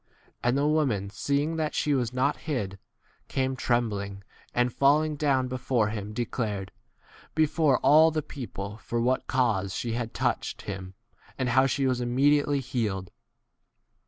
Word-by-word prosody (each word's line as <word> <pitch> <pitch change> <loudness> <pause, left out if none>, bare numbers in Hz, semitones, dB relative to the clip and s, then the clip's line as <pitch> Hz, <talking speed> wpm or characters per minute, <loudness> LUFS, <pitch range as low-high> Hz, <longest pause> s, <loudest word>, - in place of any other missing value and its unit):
And 120 +2 +2
the 140 - +2
woman, 135 -11 +1
seeing 145 +9 -1
that 155 -1 -1
she 150 - +1
was 125 -4 0
not 130 +3 +1
hid, 105 - -3 0.5
came 130 0 -1
trem 120 -2 +1
bling, 100 -2 -5 0.3
and 125 0 +1
falling 150 +2 +3
down 140 -3 +1
before 125 -3 0
him 105 -1 -5
declared 105 -4 -3 0.3
f - - -23
before 155 -2 +3
all 155 +2 +7
the 155 -1 -2
people 105 -8 -7
for 120 +1 -3
what 125 +2 +1
cause 105 -7 +1
she 120 - -2
had 115 -1 -3
touched - - -1
him, 95 -1 -6 0.4
and 130 -2 0
how 130 +2 +4
she 135 +1 0
was 130 -1 +1
immedi 135 +5 +3
48 - - -6
ately 145 -1 +1
healed. 110 -8 -2
125 Hz, 160 wpm, -27 LUFS, 110-140 Hz, 0.5 s, all